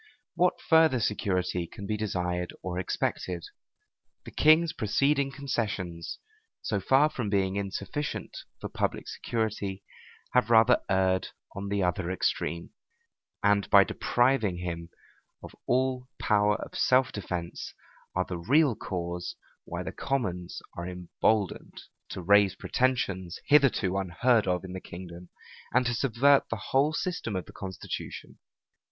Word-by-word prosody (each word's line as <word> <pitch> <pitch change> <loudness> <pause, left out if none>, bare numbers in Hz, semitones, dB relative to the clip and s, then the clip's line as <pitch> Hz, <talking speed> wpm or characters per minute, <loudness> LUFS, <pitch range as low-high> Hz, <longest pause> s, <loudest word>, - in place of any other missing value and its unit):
What 180 0 +2
further 160 -5 +4
security 90 -5 -1
can 100 - -9
be 110 - -1
desired 90 -4 -2
or 90 -1 -3
expected? 90 -1 -2 0.8
The - - -9
king's 155 +2 +5
preceding 135 +5 +1
concessions, 105 -11 -3 0.5
so 105 - 0
far 135 +9 +4
from 120 -8 -4
being 95 -1 +1
insufficient 100 +8 -4 0.2
for - - -5
public - - -2
security, 105 -4 -3 0.5
have 125 -3 +3
rather 115 +2 +6
erred 95 -1 +2 0.3
on 100 0 -4
the 100 -1 0
other 90 0 0
extreme; 85 -2 -1 0.7
and, 105 -1 +3
by 100 -1 +8
depriving 120 -5 +1
him 85 -1 -5 0.5
of - - -9
all 130 0 +1
power 105 0 +3
of - - -7
self 130 0 +3
defence, 90 -4 -5 0.4
are 90 0 +1
the 90 -2 -5
real 135 - +3
cause 85 -2 -4 0.3
why - - -4
the - - -5
commons 90 -11 -3
are 85 +1 -5
emboldened 90 +3 -1 0.3
to 95 - -6
raise 100 +1 +5
pretensions 100 -9 -1
hitherto 135 -10 +4
unheard 105 +5 +2
of 90 0 0
in 90 - -7
the 95 - -6
kingdom, 85 0 -10 0.4
and 125 +1 +3
to 120 - +1
subvert 135 +3 +3
the 110 -2 -5
whole 140 +3 +4
system 160 - -3
of 90 - -3
the - - -14
constitution. 95 -2 -7
100 Hz, 135 wpm, -28 LUFS, 90-125 Hz, 0.8 s, by